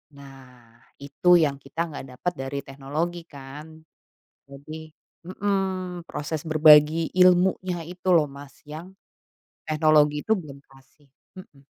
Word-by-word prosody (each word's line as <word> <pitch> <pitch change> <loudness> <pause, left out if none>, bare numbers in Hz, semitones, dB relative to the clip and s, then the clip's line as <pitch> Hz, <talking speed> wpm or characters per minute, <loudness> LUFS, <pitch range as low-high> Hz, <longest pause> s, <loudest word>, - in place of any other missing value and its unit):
Nah, 125 -4 -16 0.2
itu 175 +5 +3
yang 145 -5 +2
kita 165 +4 -4
enggak 135 -5 -9
dapat 180 +7 -3
dari 135 +1 -4
teknologi 155 +6 -5
kan. 150 +3 -12 0.7
Jadi 155 +3 -10 0.4
hmm, 185 -3 -3
proses 155 0 -4
berbagi 155 +1 +5
ilmunya 180 -1 +3
itu 180 +2 -8
loh 155 - +4
Mas, 140 0 -14
yang 160 +5 -10 0.7
teknologi 155 -1 +3
itu 220 - -3
belum 145 -7 -9
kasih 135 +2 -23 0.3
hmm. 140 -6 -16
155 Hz, 115 wpm, -24 LUFS, 140-175 Hz, 0.7 s, berbagi